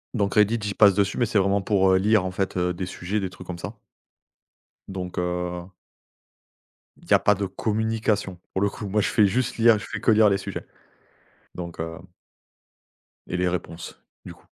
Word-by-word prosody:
donc 100 -3 0
Reddit 105 +2 +4
j'y 100 -1 -2
passe 100 -2 +6
dessus 100 0 0
mais 120 - +2
c'est 105 -2 +1
vraiment 100 +1 +2
pour, 95 -1 +2
heu, - - +5
lire 105 +1 +3
en 95 - -2
fait, 95 0 -2
heu, 90 0 +1
des 90 +1 -4
sujets, 90 +3 -3
des 95 -2 -3
trucs 90 0 -13
comme 90 - -5
ça. 85 - -6 1.1
Donc 90 -2 -6
heu 90 0 -3 1.3
il - - -18
y - - +5
a - - +4
pas 105 - +4
de 100 - -2
communication. 110 -3 -1
Pour 95 - -1
le 100 - +3
coup, 105 +1 -7
moi, 105 +2 +1
je - - 0
fais 105 - +4
juste 125 +4 -1
lire, 115 -2 +5
je - - -8
fais - - -5
que - - +3
lire 110 -1 +6
les 100 - +2
sujets. 100 -1 -6 0.9
Donc 85 -2 -7
heu 80 0 -4 1.3
et 90 - -3
les 90 0 +1
réponses, 85 -1 -5 0.2
du - - -8
coup. - - -23
95 Hz, 200 wpm, -24 LUFS, 90-105 Hz, 1.3 s, passe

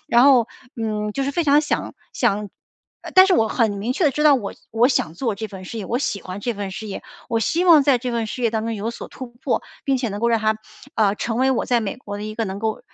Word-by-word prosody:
然 240 -2 +5
后， 255 -5 +5 0.3
嗯， 210 -2 -2
就 275 - -2
是 275 - -1
非 335 +4 0
常 290 0 +5
想 295 - -2 0.2
想 205 +1 +1 0.5
呃， - - -8
但 375 0 +9
是 375 - +4
我 220 - +3
很 225 -3 +1
明 205 +5 -2
确 345 - 0
地 295 - +5
知 300 +3 -1
道 295 -2 +7
我 205 -6 -3 0.2
我 230 +3 +4
想 160 - 0
做 225 +4 -2
这 220 - -5
份 190 -2 -9
事 230 - -7
业， 210 - -4
我 240 +6 -1
喜 205 -7 -2
欢 185 +2 -7
这 240 +2 -2
份 200 -1 -4
事 215 +3 -6
业， 200 - -6 0.3
我 230 - +1
希 340 +9 +1
望 325 -4 +8
在 275 -3 +4
这 250 +1 -3
份 230 -2 -1
事 250 - -6
业 230 - +3
当 220 -1 -1
中 230 0 -2
有 215 +2 -3
所 - - -8
突 260 - -8
破， 240 +2 -2 0.2
并 270 -3 +1
且 245 - -1
能 205 0 -5
够 235 +2 +1
让 230 -2 +2
它， 215 0 +1 0.4
呃， 205 -2 +3
成 225 +1 -3
为 260 +2 +3
我 260 - 0
在 245 -2 +2
美 200 +1 -3
国 205 -5 -7
的 205 - -6
一 215 0 -5
个 225 -1 -2
能 190 +1 -5
够 220 0 -2
230 Hz, 305 characters per minute, -22 LUFS, 210-260 Hz, 0.5 s, 但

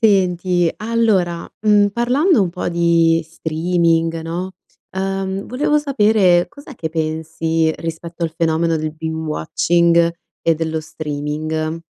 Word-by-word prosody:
Senti 180 -4 +2
allora, 215 -7 0
uhm, 205 -1 +4
parlando 250 - +2
un 180 - -1
po' 180 - -3
di 170 -1 +3
streaming 165 0 0
no, 175 +3 -4 0.4
ehm, 195 +1 -3
volevo 295 +4 +1
sapere: 210 -10 +3
cos'è 285 - -13
che 160 - -3
pensi 160 0 -1
rispetto 165 +1 -6
al 165 - 0
fenomeno 165 0 +1
del 155 0 -3
binge-watching 165 +2 +1 0.3
e 165 - +3
dello 160 0 -2
streaming? 155 +1 -4
170 Hz, 115 wpm, -19 LUFS, 160-195 Hz, 0.4 s, uhm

